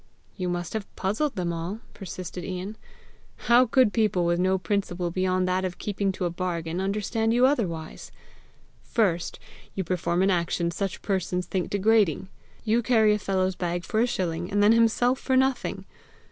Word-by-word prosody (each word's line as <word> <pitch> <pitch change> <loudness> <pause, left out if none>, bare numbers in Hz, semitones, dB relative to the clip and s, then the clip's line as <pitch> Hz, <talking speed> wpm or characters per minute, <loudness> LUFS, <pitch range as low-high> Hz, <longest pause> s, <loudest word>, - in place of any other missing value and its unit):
"You 180 -2 -2
must 175 -1 -3
have 220 -2 -3
puzzled 215 +8 -1
them 175 -3 -1
all!" 170 +6 -4
persisted 180 -2 -7
Ian. 185 +4 -5 0.6
"How 245 +2 +4
could 250 -2 +4
people 210 -6 +2
with 170 0 +1
no 185 +1 +2
principle 180 -2 -2
beyond 185 0 +1
that 185 +1 0
of 185 -1 -3
keeping 200 -1 -1
to 185 - -3
a 175 - -1
bargain, 175 -1 -3
understand 215 +3 0
you 245 +1 +5
otherwise! 180 - -2 0.7
First, 180 -7 0 0.4
you 190 - -1
perform 180 0 0
an 195 - +3
action 170 -1 0
such 195 +2 -4
persons 185 -2 -1
think 185 -2 -2
degrading: 200 -4 +2 0.3
you 230 +2 +2
carry 220 -2 +4
a 210 - 0
fellow's 190 -1 0
bag 175 -1 -3
for 215 - -1
a 240 - +3
shilling, 175 -5 -2
and 205 +1 +2
then 210 - +6
himself 230 +3 +3
for 260 -1 +1
nothing! 265 -1 0
190 Hz, 170 wpm, -26 LUFS, 175-220 Hz, 0.7 s, then